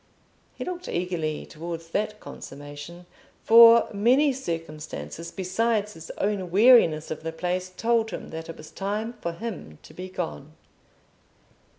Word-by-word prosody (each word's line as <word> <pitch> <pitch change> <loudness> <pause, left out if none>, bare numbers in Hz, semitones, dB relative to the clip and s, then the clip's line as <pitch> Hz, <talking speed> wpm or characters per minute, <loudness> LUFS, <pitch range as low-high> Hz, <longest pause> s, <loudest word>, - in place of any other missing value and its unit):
He - - -5
looked 360 0 -5
eagerly 170 -4 -2
towards 165 +1 -7
that 210 +4 -2
consummation, 145 +5 -10 0.4
for 230 0 +8
many 255 +8 +4
circumstances 165 - -6
besides 210 +3 0
his 165 0 -11
own 195 -3 -1
weariness 190 -7 +5
of 155 - -4
the 165 +1 -4
place 180 +2 -2
told 230 -1 +2
him 185 - -7
that 160 0 -7
it 165 - -7
was 155 - -12
time 210 +4 -3
for 170 - -2
him 180 - -7
to - - -14
be 185 +1 -7
gone. 160 -5 -5
180 Hz, 135 wpm, -26 LUFS, 165-220 Hz, 0.4 s, for